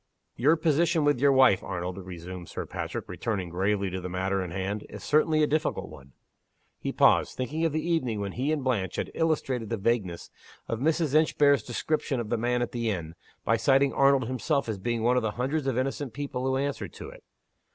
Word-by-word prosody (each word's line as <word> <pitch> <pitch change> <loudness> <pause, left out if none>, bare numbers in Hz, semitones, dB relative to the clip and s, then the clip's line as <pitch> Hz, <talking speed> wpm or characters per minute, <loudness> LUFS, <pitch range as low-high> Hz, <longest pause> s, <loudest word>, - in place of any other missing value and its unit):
"Your 145 +7 +4
position 165 +1 +2
with 145 -4 +3
your 140 +1 +5
wife, 130 -8 +5
Arnold," 90 +1 -4
resumed 90 -1 -8
Sir - - -5
Patrick, - - -5
returning 100 -6 -3
gravely 95 +2 0
to 95 0 -4
the 90 - -5
matter 95 +1 -1
in 90 - -5
hand, 95 +4 -3
"is - - -9
certainly 155 +1 +3
a - - +6
difficult 150 -10 -1
one." 70 -3 -14 0.7
He - - -3
paused, - - +3
thinking 150 +6 -1
of 165 - +1
the 155 +3 -2
evening 130 -11 0
when 100 -1 -3
he 130 +8 -1
and 150 -3 -1
Blanche 105 -9 -1
had - - -3
illustrated 135 -8 0
the 115 - -1
vagueness 100 -5 -1 0.4
of 115 - -2
Mrs. 155 +1 +1
Inchbare's 145 -2 +4
description 135 +2 -2
of 115 -3 -4
the 120 - +2
man 120 +2 +1
at - - -4
the 115 -2 -1
inn, 85 -6 -3 0.3
by 115 - +3
citing 135 +4 +3
Arnold 135 -2 +4
himself 135 +3 -1
as 110 -3 -3
being 115 +2 -1
one 125 +2 +3
of - - +3
the 110 -2 -2
hundreds 135 +3 -1
of 130 -3 0
innocent 135 -1 -2
people 135 -3 -3
who 130 0 +1
answered 140 +1 -3
to - - -9
it! - - -15
125 Hz, 210 wpm, -27 LUFS, 100-145 Hz, 0.7 s, a